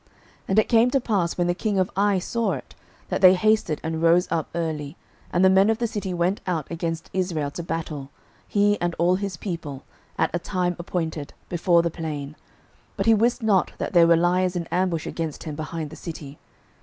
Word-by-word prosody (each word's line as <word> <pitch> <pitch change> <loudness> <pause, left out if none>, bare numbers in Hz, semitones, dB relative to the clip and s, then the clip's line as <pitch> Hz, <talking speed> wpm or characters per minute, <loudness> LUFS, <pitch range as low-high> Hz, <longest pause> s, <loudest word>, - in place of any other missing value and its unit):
06:008:014 - - -33 0.4
And 195 - 0
it 215 - +2
came 230 +1 +5
to 275 - +2
pass, 200 -8 -1
when 175 - +1
the 175 - +1
king 205 +2 -1
of 185 -1 +1
Ai 200 0 +3
saw 215 +2 -1
it, 130 -4 -8 0.4
that - - -1
they 185 -1 +8
hasted 215 -5 +2
and 160 0 -3
rose 170 +2 +4
up 160 -2 -1
early, 155 -3 -3 0.3
and 180 +2 +3
the - - +7
men 190 +2 +5
of 225 - +2
the 235 - -1
city 205 -4 -3
went 175 +3 0
out 165 -5 -1
against 165 -1 -4
Israel 170 -6 -1
to 170 - -5
battle, 160 -4 -4 0.4
he 205 0 +2
and 175 -1 -1
all 175 +2 +3
his 195 -3 -4
people, 155 -7 -5 0.3
at - - +1
a 175 - 0
time 180 -1 -1
appointed, 165 -4 -4 0.2
before 175 -1 +3
the 170 - -1
plain; 150 -3 -5 0.6
but - - -1
he 225 - +6
wist 235 +3 +2
not 200 -4 +2
that - - -4
there 170 -2 +6
were 170 0 +5
liers 180 +2 +2
in 170 -1 -2
ambush 180 -3 0
against 160 -3 -4
him 155 - -5
behind 155 0 -5
the - - -9
city. 150 -4 -8
175 Hz, 210 wpm, -24 LUFS, 160-190 Hz, 0.6 s, they